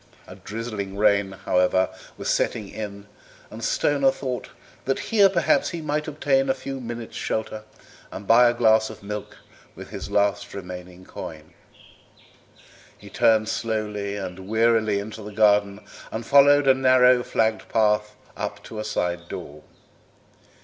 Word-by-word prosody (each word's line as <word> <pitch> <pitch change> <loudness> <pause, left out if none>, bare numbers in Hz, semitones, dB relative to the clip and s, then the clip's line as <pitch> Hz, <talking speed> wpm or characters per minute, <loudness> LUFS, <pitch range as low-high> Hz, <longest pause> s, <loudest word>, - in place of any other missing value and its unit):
A - - -11
drizzling 105 -3 -6
rain, 100 -2 +2
however, 95 -1 +1 0.3
was - - -6
setting 105 -3 0
in, 100 -2 -7 0.5
and - - -9
Stoner 140 -2 +2
thought 130 -2 -4 0.4
that 135 - 0 0.2
here 200 -3 +6
perhaps 180 -3 +2
he 170 - -5
might 150 0 -2
obtain 140 -3 +1
a 135 - +2
few 135 +1 -6
minutes' 120 -1 -7
shelter 110 0 -3 0.5
and 100 - -8
buy 120 +3 +6
a - - 0
glass 110 -2 +3
of 110 - -11
milk 105 0 -6 0.4
with - - -11
his - - -6
last 100 0 0
remaining 90 -1 -9
coin. 80 -3 -9 1.4
He - - -14
turned 110 -1 +3
slowly 105 -3 -3
and 95 -1 -7
wearily 110 -2 +2
into 110 +2 -6
the 105 0 -8
garden 105 -1 +3 0.3
and 110 +1 -5
followed 140 +1 +5
a 135 - +7
narrow, 130 -1 +5
flagged 110 -2 -1
path 105 -1 +1 0.2
up - - -5
to 110 - -8
a - - -3
side 90 -5 -2
door. 75 -2 -8
110 Hz, 145 wpm, -24 LUFS, 100-125 Hz, 1.4 s, a